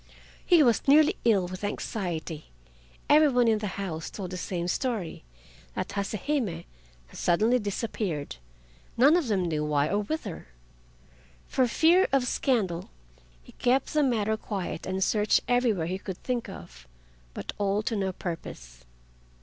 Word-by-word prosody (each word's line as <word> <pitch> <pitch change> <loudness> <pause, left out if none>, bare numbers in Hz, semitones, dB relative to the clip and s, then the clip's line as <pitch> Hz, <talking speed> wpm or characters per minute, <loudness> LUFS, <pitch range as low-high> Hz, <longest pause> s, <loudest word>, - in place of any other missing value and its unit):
He 345 -4 +5
was 240 0 +2
nearly 310 +6 +6
ill 200 -6 +3
with 185 +2 -8
anxiety. 175 -6 -4 0.6
Every 305 +1 +6
one 250 -3 +3
in 220 -1 +3
the 210 - -3
house 165 -5 -4
told 185 -3 -6
the - - -4
same 175 -1 -3
story—that 175 - -5
Hase 200 0 -3
Hime 290 -5 +1
had 170 -2 -6 0.5
suddenly 220 +8 +2
disappeared, 200 - -3 0.6
none 280 +7 +6
of 345 -7 +1
them 195 -5 +1
knew 155 -3 -1
why 150 0 +1
or 205 - +1
whither. 210 - -4 1.0
For 260 -2 +1
fear 335 +9 +4
of 270 -2 +2
scandal 210 -10 0 0.5
he - - -15
kept 255 +2 +1
the 305 - +3
matter 220 -6 +1
quiet 195 -6 -5
and 190 +1 0
searched 210 +1 +2
everywhere 240 -9 +2
he 185 +3 -3
could 190 -2 -6
think 245 -2 -2
of, - - -11 0.5
but - - -5
all 205 +1 +1
to 225 - -1
no 195 -2 -1
purpose. - - -7
205 Hz, 150 wpm, -27 LUFS, 175-245 Hz, 1.0 s, nearly